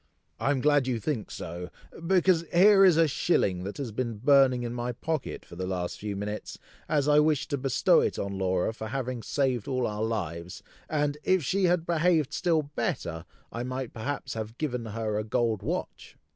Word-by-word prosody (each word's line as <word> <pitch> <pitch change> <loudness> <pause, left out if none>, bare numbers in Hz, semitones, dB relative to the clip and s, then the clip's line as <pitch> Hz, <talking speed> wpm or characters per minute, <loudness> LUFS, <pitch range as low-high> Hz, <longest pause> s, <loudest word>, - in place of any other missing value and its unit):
"I 120 - 0
am 140 -3 +1
glad 145 -2 +3
you 125 -3 0
think 120 -3 -3
so, 90 +2 -6 0.4
because 185 -2 +4
here 195 +3 +7
is 180 -4 +6
a 165 -1 +5
shilling 95 - +1
that 100 - -6
has 135 -5 -4
been 115 0 -3
burning 130 0 +4
in 120 0 -3
my 120 0 -3
pocket 155 +3 -4
for 85 - -12
the 90 +1 -4
last 90 -2 -3
few 105 -1 -4
minutes, 105 +2 -5 0.3
as 145 -2 +1
I 150 0 +6
wished 150 0 +1
to 140 - +1
bestow 135 -1 +3
it - - -1
on 100 0 -3
Laura 95 +2 0
for 110 -1 -6
having 125 0 -3
saved 130 -3 -1
all 130 -2 0
our 105 0 -3
lives, 90 -6 -4 0.3
and 150 -1 0
if 185 -3 +2
she 190 +8 +1
had 175 -2 +2
behaved 165 -3 +2
still 165 -3 +1
better, 125 - -3 0.3
I 115 - -4
might 130 0 -4
perhaps 135 +6 -4
have 110 +1 -6
given 125 -6 -3
her 110 -1 -2
a - - -2
gold 110 -1 0
watch!" - - -5
125 Hz, 195 wpm, -28 LUFS, 105-150 Hz, 0.4 s, here